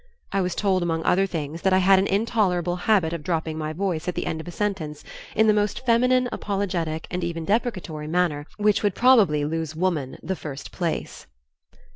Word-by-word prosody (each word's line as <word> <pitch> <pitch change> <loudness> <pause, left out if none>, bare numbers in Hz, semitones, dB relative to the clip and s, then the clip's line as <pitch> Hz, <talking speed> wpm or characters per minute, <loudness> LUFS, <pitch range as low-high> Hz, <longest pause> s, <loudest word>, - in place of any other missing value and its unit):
I 195 - +1
was 180 -1 -1
told 190 -3 +1
among 165 -1 -1
other 195 +2 +3
things 160 -2 -5
that 190 0 +2
I - - +5
had 190 +1 +5
an 195 - +1
intolerable 195 -5 +1
habit 180 -3 +2
of 170 - -4
dropping 160 -1 -2
my 155 0 -3
voice 175 -1 -2
at 180 - -2
the - - -2
end 160 - -3
of 160 - -13
a - - -5
sentence 170 -7 -3 0.3
in 220 - +4
the 215 - +5
most 210 +4 -1
feminine, 250 +1 +3
apologetic 180 -6 -2
and 180 0 -2
even 165 -1 -3
deprecatory 185 -8 -1
manner 155 -3 0
which 210 0 +2
would 205 -3 +1
probably 205 - +4
lose 160 0 -3
Woman 160 -6 -1
the 190 +4 -2
first 140 -5 -8
place. 170 -3 -4
180 Hz, 195 wpm, -24 LUFS, 160-200 Hz, 0.3 s, I